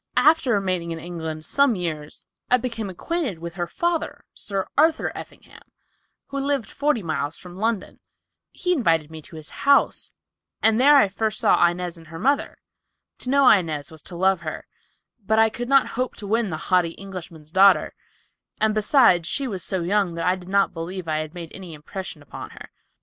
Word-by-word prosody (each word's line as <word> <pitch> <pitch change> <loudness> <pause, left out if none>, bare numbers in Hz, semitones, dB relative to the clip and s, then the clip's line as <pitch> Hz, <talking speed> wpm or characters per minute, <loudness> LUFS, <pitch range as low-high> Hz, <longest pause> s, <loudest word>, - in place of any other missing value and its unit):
"After 285 0 +4
remaining 185 -4 -1
in 165 - -4
England 160 -2 -6
some 280 - +3
years 155 -5 -4 0.3
I 250 - +5
became 230 -4 -4
acquainted 260 - -3
with 170 +1 -7
her 175 -1 -3
father, 340 - -2
Sir 195 -2 -3
Arthur 315 +2 +3
Effingham, - - -12 0.7
who 275 - -3
lived 275 -6 -1
forty 285 -7 0
miles 155 -2 -2
from 180 -1 -11
London. 220 +1 -2 0.5
He 360 -1 -1
invited 165 - +1
me 160 -1 -8
to 165 +2 -14
visit 155 -1 -8
his - - -10
house 280 0 +3 0.5
and 225 +2 +3
there 290 +2 +7
I 240 - +5
first 215 +3 -2
saw 175 - +5
Inez 175 -1 -5
and 165 - -16
her 165 +1 -9
mother. 275 +10 0 0.6
To 250 - -6
know 275 0 +4
Inez 160 -7 +3
was 160 -2 -10
to 175 - -9
love 190 0 +2
her, 155 -2 -6 0.6
but 220 +2 +1
I 225 0 +5
could 245 0 -5
not 275 -1 +4
hope 255 +1 -3
to 205 - -8
win 220 +1 +1
the 155 - -3
haughty 175 0 +1
Englishman's 175 -5 -9
daughter, 195 +2 +5 0.7
and 220 0 +2
besides 210 - +4
she 275 -2 0
was 195 -6 -4
so 185 -3 -1
young 190 -1 +1
that 165 - -3
I 180 - +3
did 185 -1 -12
not 200 0 +2
believe 175 +1 -6
I 155 -1 0
had 155 +2 -6
made 170 -3 -7
any 180 -4 -9
impression 155 +1 -8
upon 145 - -9
her. - - -11
190 Hz, 190 wpm, -23 LUFS, 165-235 Hz, 0.7 s, there